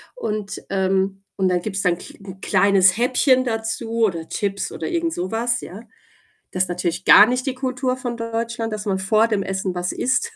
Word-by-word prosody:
und, 210 - -4
ähm, 195 0 0
und 190 - +2
dann 180 -1 +1
gibt's 195 0 -3
ki 180 -1 -2
'n 190 -1 -11
kleines 190 0 +4
Häppchen 255 +2 +3
dazu, 225 0 -2
oder 165 -5 -3
Chips, 200 -1 -3
oder - - -5
irgendsowas, 240 - -1
ja. 195 +5 -9 0.7
Das 185 - +1
ist 185 - -5
natürlich 175 0 -2
gar 210 - +9
nicht 250 +1 -1
die 260 - -1
Kultur 255 0 -2
von 245 -2 -4
Deutschland, 230 0 -3
dass 210 0 -5
man 195 -2 0
vor 215 +4 +3
dem 210 -3 0
Essen 190 -1 -3
was 180 0 -2
isst. 450 - 0
210 Hz, 180 wpm, -21 LUFS, 190-235 Hz, 0.7 s, gar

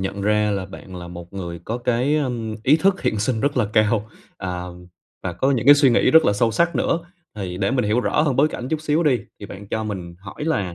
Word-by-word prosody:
nhận 95 +1 -3
ra 105 +1 +2
là 100 -2 -2
bạn 95 -1 -11
là 85 -1 -8
một 85 0 -10
người 85 -3 -6
có 115 +2 -3
cái, 125 +4 +1
ờm, 120 -6 -2
ý 140 +6 +5
thức 190 +4 +1
hiện 110 - 0
sinh 110 +2 0
rất 140 +2 0
là 125 - +3
cao, 110 0 +2 0.3
à, 90 -2 -4 0.6
và 90 - -3
có 130 +11 0
những 125 -5 0
cái 145 - +10
suy 145 -2 +4
nghĩ 120 - +3
rất 160 0 +6
là - - +3
sâu 115 +3 +1
sắc 170 +10 +1
nữa. 170 - +1 0.4
Thì 95 -4 -5
để 100 +2 0
mình 125 -3 +1
hiểu 105 +4 +2
rõ 150 - +1
hơn 145 -5 0
bối 145 +4 +4
cảnh 125 -4 -6
chút 155 0 -1
xíu 155 +1 +1
đi, 135 -7 +2 0.2
thì 100 - -7
bạn 100 +1 -10
cho 110 +1 -2
mình 90 -5 -6
hỏi 100 +9 -8
là 100 - -1
110 Hz, 255 wpm, -22 LUFS, 100-140 Hz, 0.6 s, cái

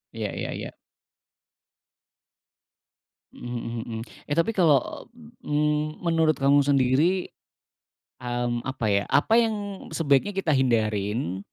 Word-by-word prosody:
iya - - -3
iya - - -4
iya. - - -6 2.6
Mhm 120 0 -6
mhm 115 -1 -5
mhm. 110 -1 -5 0.3
Eh, 145 - -1
tapi 170 +7 +2
kalau, 165 - +1 0.4
mmm, 150 +1 0
menurut 165 -2 +2
kamu 140 +1 +3
sendiri, 145 +7 +2 0.9
mmm, 120 -1 -2
apa 130 -4 -3
ya, 100 0 +2
apa 220 +11 +3
yang 225 -2 +1 0.4
sebaiknya 165 +6 +2
kita 180 -5 0
hindarin, 110 - 0
140 Hz, 110 wpm, -25 LUFS, 120-160 Hz, 2.6 s, kamu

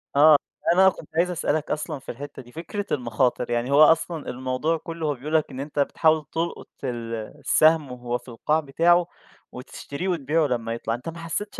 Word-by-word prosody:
آه، 150 +2 +8 0.4
أنا 190 +2 +6
كنت 160 - -10
عايز 175 +2 +2
أسألك 155 -3 -1
أصلًا 150 -1 -3
في - - -7
الحتّة 145 +3 -9
دي، 120 -1 -16
فكرة 175 - -5
المخاطر، 125 -1 0
يعني 120 +3 -1
هو 145 +2 +7
أصلًا 160 0 +2
الموضوع 130 +6 -1
كُلّه 165 0 -6
هو 145 - +1
بيقول 145 +5 -7
لك 155 - +1
إن 130 - -7
أنت 145 +1 -4
بتحاول 155 +2 +2
تلقط 165 +1 -3 0.2
ال 120 -3 -4 0.3
السهم 155 -3 +3
وهو 120 -1 -3
في 125 - -21
القاع 150 +7 0
بتاعه، 170 +4 +3 0.4
وتشتريه، 140 +6 -7
وتبيعه 160 -2 +1
لمّا 115 -3 -2
يطلع، 115 -1 -3
أنت 125 +7 -5
ما 165 - -9
حسّيتش 170 +5 -4
150 Hz, 185 wpm, -24 LUFS, 125-165 Hz, 0.4 s, آه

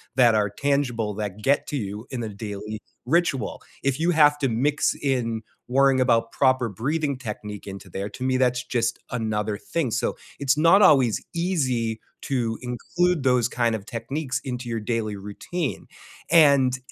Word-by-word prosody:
that 120 -4 +5
are 105 -1 +2
tangible 125 -4 0
that 105 -1 -5
get 140 +6 +2
to - - -3
you 105 -1 -5
in 125 -3 -3
the 110 - -3
daily 105 +1 -6 0.3
ritual. 140 -4 0 0.2
If 135 +1 0
you 170 +2 +2
have 150 -3 +5
to 140 - +1
mix 145 +6 +1
in 120 -5 0 0.3
worrying 135 +1 +4
about 115 -3 +2
proper 130 -3 +2
breathing 140 - -1
technique 105 -4 -7
into 100 -1 -9
there, 95 +3 -4
to 125 +5 -8
me 130 0 +1
that's 125 -1 +1
just 120 -2 -1
another 110 -3 -2
thing. 165 +3 -2
So - - -1 0.2
it's 140 0 +2
not 170 +6 +6
always 135 - +5
easy, 130 -11 0 0.2
to 120 -4 -1
include 155 +7 0
those 125 -3 +3
kind 120 -2 +1
of 110 -3 -3
techniques 130 +4 -3
into 125 -2 -5
your 115 -1 -2
daily 110 -1 -2
routine, 105 - -5 0.4
and 140 -6 +5
125 Hz, 165 wpm, -24 LUFS, 110-140 Hz, 0.4 s, not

